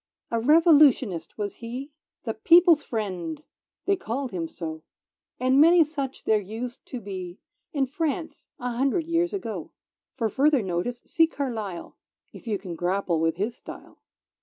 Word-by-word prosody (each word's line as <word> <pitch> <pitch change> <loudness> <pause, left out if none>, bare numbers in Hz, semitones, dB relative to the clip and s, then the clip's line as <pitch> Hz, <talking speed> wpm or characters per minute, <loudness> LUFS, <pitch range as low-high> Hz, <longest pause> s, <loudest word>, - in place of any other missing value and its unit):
A 230 - +1
Revolutionist 275 - +4
was 205 -2 -4
he; 250 +5 -7 0.3
The 225 - -2
People's 335 - +6
Friend, 185 - -4 0.4
they 395 - +3
called 270 - -4
him 170 -3 -3
so, 160 -1 -6 0.6
And 260 +2 +4
many 335 +2 +7
such 280 -3 -5
there 215 -1 +2
used 225 +5 -6
to 250 - -5
be 190 -4 -7 0.3
In 280 -3 +1
France, 320 +4 -3
a 250 0 -3
hundred 270 +7 0
years 335 +1 +1
ago. 220 - -5 0.5
(For 235 -4 0
further 275 +2 +2
notice 190 +7 -3
see 325 -1 +3
Carlyle, 220 - -5 0.4
If - - -13
you 210 -2 0
can 185 -2 -7
grapple 175 -1 0
with 165 0 +1
his 210 +6 -2
style.) - - -12
240 Hz, 150 wpm, -26 LUFS, 195-290 Hz, 0.6 s, many